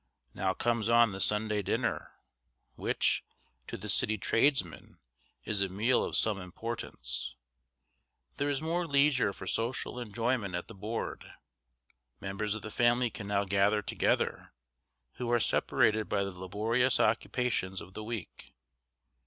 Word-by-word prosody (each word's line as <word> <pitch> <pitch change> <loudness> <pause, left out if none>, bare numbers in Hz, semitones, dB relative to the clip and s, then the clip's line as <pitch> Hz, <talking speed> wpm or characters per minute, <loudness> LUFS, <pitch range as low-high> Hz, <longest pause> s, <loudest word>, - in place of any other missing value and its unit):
Now 95 0 0
comes 115 -2 0
on 115 -2 +5
the 95 - -6
Sunday 105 +1 +2
dinner, - - -2 0.6
which, - - +1 0.4
to - - -5
the 105 - -8
city 110 +1 +2
tradesman, 115 - +1 0.5
is 100 -2 0
a 100 - +1
meal 110 +7 +2
of - - -2
some 105 -3 +1
importance. 85 - -5 1.0
There 145 +1 0
is 140 +1 -1
more 170 +2 -1
leisure 140 -6 +3
for 95 - -9
social 120 +4 -1
enjoyment 115 -3 -1
at 90 - -4
the - - -9
board. 105 +3 -5 0.9
Members 105 +2 -2
of 110 - -7
the 110 - -6
family 120 +1 +2
can 100 - -7
now 100 0 +1
gather 100 +2 +2
together, - - 0 0.6
who 120 -1 -3
are 120 - +4
separated 110 0 +2
by 100 -1 +1
the 100 - -3
laborious 110 +8 0
occupations 110 -4 +1
of 95 - -11
the 110 - -6
week. 110 -4 -7
110 Hz, 140 wpm, -31 LUFS, 100-120 Hz, 1.0 s, on